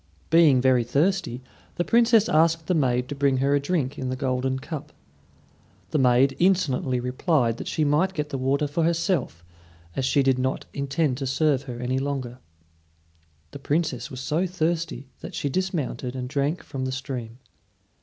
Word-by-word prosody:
Being 160 -6 +6
very 130 -2 +4
thirsty, 150 0 0 0.3
the 175 - 0
Princess 230 -2 +4
asked 165 -2 +3
the 180 - +1
maid 125 -5 +1
to - - -3
bring 140 -1 +1
her 135 +2 +2
a 145 - +3
drink 145 -2 -2
in 130 - -3
the 130 - -2
golden 130 0 -1
cup. 150 +2 -7 1.0
The 155 - +1
maid 130 +1 +4
insolently 145 -9 +2
replied 125 -1 0
that - - -7
she 155 - 0
might 155 +6 +2
get 150 -1 -2
the 135 - -3
water 135 +3 +1
for 145 +4 -2
herself, 165 - 0 0.5
as 135 - -1
she 135 +2 +2
did 130 -1 +2
not 130 +1 -1
intend 140 -1 -1
to 135 - -2
serve 140 0 +2
her 120 -3 -7
any 125 +2 -1
longer. 135 -3 -4 1.1
The 140 - -8
Princess 145 -2 -1
was 130 -1 -7
so 155 +7 0
thirsty 165 -6 -2
that - - -8
she 140 - -2
dismounted 150 -7 -2
and 125 -1 -4
drank 145 +5 -1
from 130 -1 -5
the 130 - -2
stream. 130 -4 -5
140 Hz, 175 wpm, -25 LUFS, 130-160 Hz, 1.1 s, Being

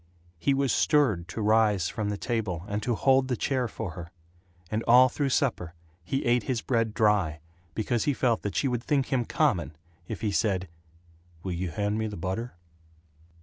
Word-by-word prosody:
He 140 +9 +2
was 135 -1 +1
stirred 120 - +2
to 110 +4 -4
rise 105 -4 +3
from 105 -1 -3
the 105 - -2
table 105 -9 -2
and 105 0 -2
to 120 +2 0
hold 135 +2 +3
the 125 -2 -1
chair 130 -3 0
for 110 -3 -5
her; 85 0 -8 0.6
and 110 +1 0
all 125 +2 +7
through 140 +2 -1
supper 120 - 0 0.3
he 135 +10 -2
ate 120 0 +3
his 120 +2 -2
bread 115 -3 0
dry 100 -8 +2 0.4
because 115 +1 0
he 145 - +2
felt 120 -3 +1
that 100 - -4
she 140 - +1
would 120 -2 -2
think 135 -1 0
him 125 -2 +1
common 95 - 0 0.3
if - - -6
he 110 -3 0
said 100 -3 0 0.8
"Will 95 - -3
you 90 +1 -2
hand 105 +5 -1
me 110 - -1
the 105 - -6
butter?" 95 +6 -4
110 Hz, 190 wpm, -27 LUFS, 95-125 Hz, 0.8 s, all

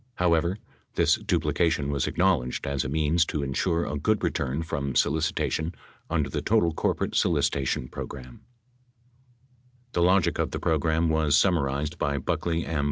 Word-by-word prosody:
However, 85 +1 +1 0.4
this - - +4
duplication 80 -3 0
was 70 -2 0
acknowledged 85 -9 +1
as 70 -1 -1
a 65 - -4
means 80 +3 +2
to 75 - -2
insure 85 +5 0
a 75 0 -3
good 110 +7 +1
return 70 +4 -1
from 70 -4 -3
solicitation 80 +1 0 0.3
under - - 0
the - - -3
total 105 -7 +2
corporate - - -1
solicitation 65 -2 +1
program. 65 0 -7
7 60 -1 -15 1.5
The 85 - +1
logic 90 +1 +3
of - - +1
the - - -4
program 80 +1 +1
was 80 -2 +3
summarized 75 -3 +1
by 70 -1 0
Buckley 85 +5 -1
M. 80 -2 -2
80 Hz, 150 wpm, -26 LUFS, 70-85 Hz, 1.5 s, this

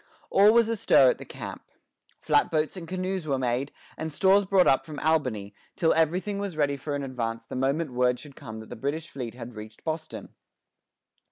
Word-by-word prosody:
All 205 +2 +7
was 230 0 +5
astir 200 - +5
at - - -6
the - - -8
camp. - - -7 0.6
Flat - - +3
boats 155 +1 0
and 175 -3 -8
canoes 185 -1 -3
were 135 -2 +1
made, 130 +2 -1 0.2
and 160 0 -4
stores 195 +6 +4
brought 190 -1 +4
up 135 - +4
from 155 -2 -9
Albany, 125 -11 0 0.2
till 160 - +3
everything 180 +6 +1
was 200 -5 -4
ready 145 -2 +2
for 145 +1 -4
an 140 - -3
advance 115 -3 -4
the - - -7
moment 135 +3 0
word 125 0 +2
should 145 -2 -12
come 110 -6 -8
that 110 - -13
the - - -7
British 145 +7 -3
fleet 125 -4 -6
had 120 -1 -8
reached 110 0 -11
Boston. 160 0 -5
145 Hz, 195 wpm, -27 LUFS, 125-170 Hz, 0.6 s, All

